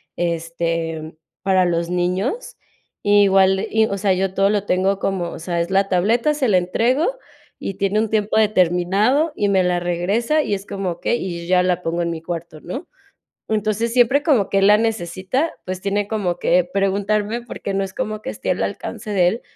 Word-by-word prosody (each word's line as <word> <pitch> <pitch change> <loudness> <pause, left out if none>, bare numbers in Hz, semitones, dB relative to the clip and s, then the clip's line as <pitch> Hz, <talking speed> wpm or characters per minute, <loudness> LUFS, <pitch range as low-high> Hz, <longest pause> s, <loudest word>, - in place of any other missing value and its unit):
este, 165 -1 -2 0.3
para 185 -1 +3
los 170 -1 0
niños. 185 - -2 0.5
Igual, 195 -2 +4
y 220 0 +3
o 200 -2 -3
sea, 195 0 +2
yo 190 0 -1
todo 195 +1 +3
lo 205 -1 0
tengo 190 +1 +1
como, 190 -3 -1
o - - -8
sea, 170 +1 -2
es 170 - -3
la 195 +1 +2
tableta, 225 +10 +2
se 290 -3 0
la 200 -4 +4
entrego 255 - +1 0.4
y 195 - -4
tiene 200 +2 0
un 220 -1 0
tiempo 215 -1 0
determinado 205 - +2
y 205 - 0
me 190 -2 +3
la 180 0 +1
regresa 195 - 0
y 205 - -1
es 195 +1 -8
como: 195 -2 -3
"Okey", 240 +7 -2
y 175 -2 -4
yo 170 - -9
ya 185 0 +4
la 180 -1 0
pongo 170 +1 -1
en 170 - -1
mi 165 -1 -4
cuarto, 165 -2 -6
¿no? 260 - -6 0.6
Entonces, 220 +2 -1
siempre 250 +3 +4
como 270 - +2
que 195 - +2
él 195 - +4
la 210 +1 +7
necesita, 225 - -1
pues, 185 0 -5
tiene 200 +1 -1
como 200 -5 -2
que 175 0 +2
preguntarme, 205 +3 0
porque 220 -4 -6
no 195 0 0
es 190 -1 -5
como 215 0 -3
que - - -8
esté 105 0 -4
al - - 0
alcance 210 - -5
de 185 -4 +3
él, 225 +6 -3
195 Hz, 200 wpm, -20 LUFS, 175-215 Hz, 0.6 s, la